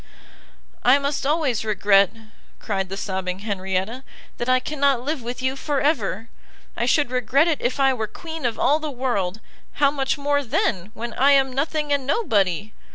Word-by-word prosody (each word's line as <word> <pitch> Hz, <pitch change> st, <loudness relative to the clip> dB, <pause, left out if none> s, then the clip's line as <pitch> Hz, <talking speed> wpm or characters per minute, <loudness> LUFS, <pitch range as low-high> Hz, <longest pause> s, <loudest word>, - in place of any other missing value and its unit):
"I 255 Hz, +3 st, +6 dB
must 280 Hz, 0 st, -2 dB
always 290 Hz, -8 st, +1 dB
regret," 200 Hz, -2 st, +4 dB, 0.5 s
cried 195 Hz, -3 st, -3 dB
the 195 Hz, -, -5 dB
sobbing 190 Hz, -2 st, -3 dB
Henrietta, 195 Hz, +3 st, -2 dB, 0.4 s
"that 240 Hz, -, -2 dB
I 255 Hz, 0 st, +5 dB
cannot 280 Hz, -2 st, +1 dB
live 295 Hz, 0 st, -2 dB
with 245 Hz, +2 st, -6 dB
you 260 Hz, +1 st, 0 dB
for 280 Hz, +1 st, -1 dB
ever! 225 Hz, -, 0 dB, 0.5 s
I -, -, -1 dB
should 290 Hz, -5 st, +2 dB
regret 255 Hz, +5 st, +2 dB
it 315 Hz, -4 st, 0 dB
if 250 Hz, +3 st, -1 dB
I 270 Hz, -1 st, +4 dB
were 220 Hz, -4 st, -3 dB
queen 320 Hz, -, -8 dB
of 235 Hz, -3 st, -1 dB
all 295 Hz, +3 st, +3 dB
the 310 Hz, -1 st, -4 dB
world, 235 Hz, -8 st, -2 dB, 0.3 s
how 280 Hz, -1 st, +3 dB
much 270 Hz, 0 st, -1 dB
more 285 Hz, 0 st, 0 dB
then, 220 Hz, -, -1 dB
when 235 Hz, 0 st, -5 dB
I 275 Hz, +4 st, +4 dB
am 270 Hz, -2 st, +3 dB
nothing 295 Hz, +2 st, -1 dB
and 275 Hz, -2 st, -1 dB
nobody! 210 Hz, -, +1 dB
255 Hz, 175 wpm, -23 LUFS, 215-285 Hz, 0.5 s, I